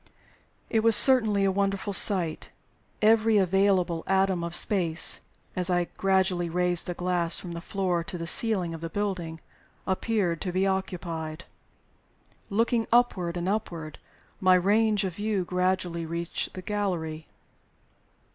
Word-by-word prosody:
It 225 - +2
was 225 0 +6
certainty 220 -7 +6
a 195 - +2
wonderful 195 +1 -2
sight. 180 -5 +1 0.5
Every 220 0 +4
available 190 -3 +1
atom 190 -2 +1
of 170 0 -1
space 175 -4 +3 0.3
(as 180 -1 +1
I 175 -1 0
gradually 190 -2 0
raised 180 0 0
the 175 - -4
glass 175 -1 0
from 175 - -8
the 170 0 -7
floor 180 -2 -2
to 180 - -6
the 165 - -6
ceiling 185 -3 +2
of 165 - -8
the 165 - -5
building) 175 -5 -4 0.4
appeared 190 -3 -1
to 180 - -3
be 185 +2 0
occupied. 170 -4 -4 1.0
Looking 230 +2 0
upward 190 -8 +1
and 175 +1 -3
upward, 175 -7 -4 0.4
my 185 -1 +4
range 210 +3 +2
of 185 -3 -5
view 205 -3 -2
gradually 180 -2 -2
reached 170 +1 -5
the 185 - -8
gallery. 170 -7 -4
185 Hz, 135 wpm, -26 LUFS, 170-200 Hz, 1.0 s, was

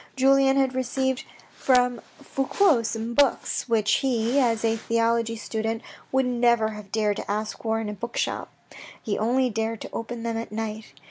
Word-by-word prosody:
Julien 270 0 +4
had 265 -1 +2
received 260 0 -1 0.3
from 250 -2 +2 0.2
Fouque 275 - +2
some 225 +1 -3
books, 270 -1 +1
which 215 -2 +3
he, 250 -1 +1
as 230 -3 +2
a 225 0 +2
theology 230 0 0
student 225 +1 -3 0.3
would 265 0 +2
never 235 -3 +2
have 210 -2 -9
dared 210 -1 +1
to - - -6
ask 215 +1 -3
for 225 -1 0
in 225 - -3
a 210 - -3
bookshop. 235 +3 -3 0.5
He 215 - -2
only 250 +3 +2
dared 225 +1 -2
to - - -7
open 230 0 -5
them 230 -1 -2
at 230 - -5
night. 215 -6 -5
230 Hz, 170 wpm, -25 LUFS, 220-255 Hz, 0.5 s, Julien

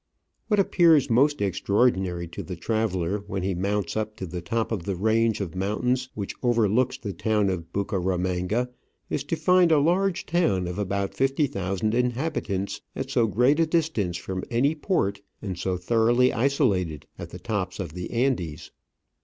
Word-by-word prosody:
What 210 -2 +2
appears 165 -8 +4
most 140 +1 +3
extraordinary 95 -3 +1
to 85 - -6
the 90 - -6
traveller 100 -1 -1
when 95 -2 -3
he 95 0 0
mounts 100 +1 -1
up 110 0 -2
to 95 - -5
the 90 0 -5
top 115 +7 -2
of 110 -5 -1
the 100 - -1
range 110 +3 +2
of 95 -6 -4
mountains 125 +7 -1
which 100 -2 -4
overlooks 120 +1 +2
the 100 -3 -5
town 105 -2 +1
of 85 -2 -5
Bucaramanga 95 +4 -1 0.4
is 145 - -1
to 155 - -1
find 175 +2 +4
a 155 - +6
large 180 +5 +1
town 160 - +1
of 90 +3 -4
about 100 -1 -1
fifty 135 +3 +1
thousand 100 -2 -2
inhabitants 120 -5 -1
at 135 0 -4
so 120 -4 +3
great 125 +8 +3
a 165 - +3
distance 155 - 0
from 95 0 -5
any 130 +6 +2
port 140 - -1 0.2
and 95 -4 -5
so 95 0 -1
thoroughly 120 +6 +3
isolated 105 - +1
in - - -5
the - - -9
tops 100 0 -3
of 85 -6 -5
the 90 0 -5
Andes. 105 - -1
110 Hz, 170 wpm, -25 LUFS, 95-130 Hz, 0.4 s, a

